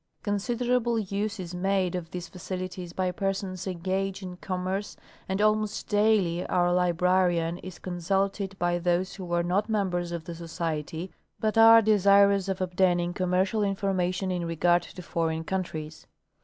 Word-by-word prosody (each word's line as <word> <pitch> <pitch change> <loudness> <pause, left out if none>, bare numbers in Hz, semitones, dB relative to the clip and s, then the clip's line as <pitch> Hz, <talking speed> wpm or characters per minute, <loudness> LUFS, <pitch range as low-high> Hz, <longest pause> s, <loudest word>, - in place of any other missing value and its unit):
Considerable 240 +3 0
use 205 +1 -2
is 180 -1 -6
made 185 0 0
of 175 -2 -4
these 180 -1 -6
facilities 185 -1 -6
by 185 0 -1
persons 195 0 -3
engaged 190 +2 -2
in 180 -1 -6
commerce, 185 +2 -3 0.3
and 190 +1 -1
almost 215 0 +1
daily 205 -5 +2
our 175 0 +2
librarian 180 -1 +2
is 185 -1 -9
consulted 195 +2 -2
by 175 -1 0
those 175 +1 0
who 180 -3 -8
are 170 0 +2
not 195 +5 0
members 180 -5 -1
of 170 -2 -4
the 170 - -6
Society, 165 0 -4 0.3
but 215 0 0
are 225 0 +8
desirous 200 -1 +4
of 190 0 -2
obtaining 180 -1 +1
commercial 185 +4 +1
information 190 -2 0
in 180 -1 -2
regard 175 +1 +3
to 180 +1 -10
foreign 160 -1 -1
countries. 160 -4 -4
185 Hz, 145 wpm, -27 LUFS, 175-200 Hz, 0.3 s, are